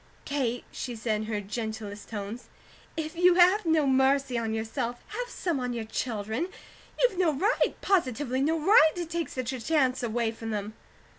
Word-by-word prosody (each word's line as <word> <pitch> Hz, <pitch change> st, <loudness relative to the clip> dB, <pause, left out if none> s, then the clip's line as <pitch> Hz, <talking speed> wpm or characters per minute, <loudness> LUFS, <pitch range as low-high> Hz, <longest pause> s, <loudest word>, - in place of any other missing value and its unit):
"Kate," 250 Hz, -4 st, -1 dB
she 245 Hz, -2 st, -5 dB
said 220 Hz, 0 st, -1 dB
in 215 Hz, -, -3 dB
her 215 Hz, -1 st, -2 dB
gentlest 210 Hz, 0 st, -5 dB
tones, 220 Hz, +2 st, -6 dB, 0.5 s
"if 315 Hz, +1 st, -3 dB
you 355 Hz, +1 st, +5 dB
have 365 Hz, +2 st, +5 dB
no 320 Hz, -2 st, +4 dB
mercy 265 Hz, 0 st, +3 dB
on 230 Hz, -2 st, -1 dB
yourself, 230 Hz, +2 st, -3 dB
have -, -, -4 dB
some 345 Hz, -, -2 dB
on 250 Hz, -1 st, -2 dB
your 230 Hz, -2 st, -3 dB
children. 220 Hz, -, -2 dB, 0.5 s
You've 485 Hz, -7 st, +2 dB
no 350 Hz, -4 st, +4 dB
right, 390 Hz, -, +1 dB
positively 265 Hz, -, +1 dB
no 320 Hz, +3 st, +2 dB
right, 315 Hz, -2 st, +6 dB
to 350 Hz, -1 st, -3 dB
take 330 Hz, -3 st, -3 dB
such 255 Hz, 0 st, -3 dB
a 255 Hz, -, -5 dB
chance 265 Hz, -2 st, +2 dB
away 230 Hz, -1 st, 0 dB
from 225 Hz, 0 st, -7 dB
them." 210 Hz, 0 st, -3 dB
255 Hz, 175 wpm, -28 LUFS, 225-320 Hz, 0.5 s, right